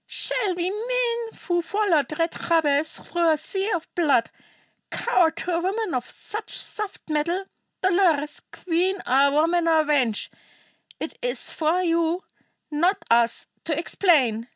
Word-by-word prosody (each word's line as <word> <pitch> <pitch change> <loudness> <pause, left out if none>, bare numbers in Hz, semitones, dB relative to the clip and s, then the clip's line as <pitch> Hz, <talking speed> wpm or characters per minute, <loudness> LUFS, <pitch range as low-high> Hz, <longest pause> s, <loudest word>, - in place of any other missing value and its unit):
Shall 405 -7 -1
we, 350 0 -1
men 470 +1 -2
who 350 -2 +2
followed 335 - +1
Red 330 0 +1
Jabez 315 -2 +1
through 340 -1 0
a 310 - +3
sea 385 +6 -3
of 345 -6 -2
blood, 280 -9 +2 0.6
cower 340 -3 +2
to 340 +2 -5
a 335 - +1
woman 390 +2 -1
of 250 -1 -2
such 430 +1 -6
soft 425 -2 -5
mettle? 335 +5 -1 0.4
Dolores, 340 -6 +2
queen 365 +2 0
or 275 +2 +4
woman 330 +4 +2
or 320 -1 +4
wench, 270 -8 +1 0.7
it - - -5
is - - -3
for 330 +3 +1
you, 335 +1 +1 0.5
not 345 +7 +1
us, 235 0 +3 0.2
to 310 -3 0
explain. 270 - +2
335 Hz, 140 wpm, -24 LUFS, 300-380 Hz, 0.7 s, or